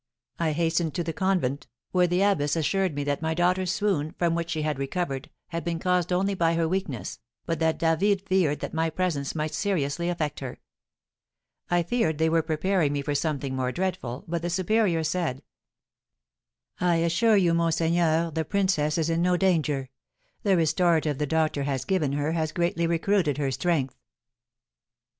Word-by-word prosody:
I 160 -2 +1
hastened 165 0 0
to 175 - -1
the 165 0 -3
convent, 165 -7 0 0.2
where 180 -1 +3
the 180 +2 +2
abbess 160 -8 +2
assured 180 +1 0
me 145 - -2
that 145 +1 -1
my 160 0 -1
daughter's 180 +1 +1
swoon, 185 -8 -1
from 170 -1 +1
which 170 0 -2
she 155 -1 -2
had 150 -3 -1
recovered, 140 -1 -3 0.2
had 170 -1 -4
been 170 -1 -2
caused 180 0 0
only 195 +3 +1
by 170 -3 +1
her 165 -1 +1
weakness, 165 - -3 0.3
but 165 -1 -2
that 160 -1 +1
David 190 +5 +2
feared 175 -6 +1
that - - -5
my 160 0 +1
presence 160 -5 -2
might 155 0 -2
seriously 170 -3 -1
affect 160 -4 -2
her. 130 -3 -6 1.1
I 175 -1 +2
feared 165 -5 0
they 160 +1 +2
were 165 0 +3
preparing 160 0 0
me 140 -1 -2
for 145 - -1
something 140 -3 -1
more 130 -1 -1
dreadful, 175 -8 -3
but 170 0 -2
the 175 - -2
superior 185 -1 +1
said: 160 -5 -2 1.4
"I 175 -1 +2
assure 170 +7 +3
you, 175 -3 +3
monseigneur, 165 0 +2
the 160 +1 -1
princess 180 -6 +1
is 160 -1 +1
in 165 +1 +1
no 180 0 +3
danger; 150 -8 +1 0.5
the 195 -3 +3
restorative 160 -2 +2
the 150 - 0
doctor 155 -1 +1
has 135 -2 -2
given 160 -8 0
her 145 +2 0
has 160 -1 -1
greatly 170 0 0
recruited 170 -2 +1
her 140 -2 0
strength." 135 -2 0
165 Hz, 175 wpm, -26 LUFS, 150-180 Hz, 1.4 s, where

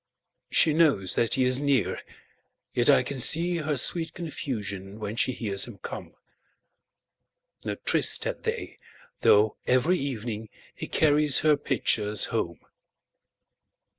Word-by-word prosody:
She 155 - +3
knows 140 - +2
that 115 - +1
he 130 - +1
is 130 +1 +2
near, 140 -5 0 0.7
yet 120 +3 +1
I 135 -3 +5
can 135 +2 -5
seeHer 155 +2 +3
sweet 165 +6 -1
confusion 105 - -6
when 105 0 -5
she 130 - 0
hears 100 -5 -1
him 120 -5 -11
come.No - - -13
tryst - - +3
had - - -4
they, - - -5 0.4
though 105 +1 +3
every 130 +9 +2
evening 115 -5 -5 0.3
heCarries 150 -2 +2
her 155 -1 +4
pitchers 110 -7 0
home. 85 -8 -3
125 Hz, 115 wpm, -26 LUFS, 105-150 Hz, 0.7 s, I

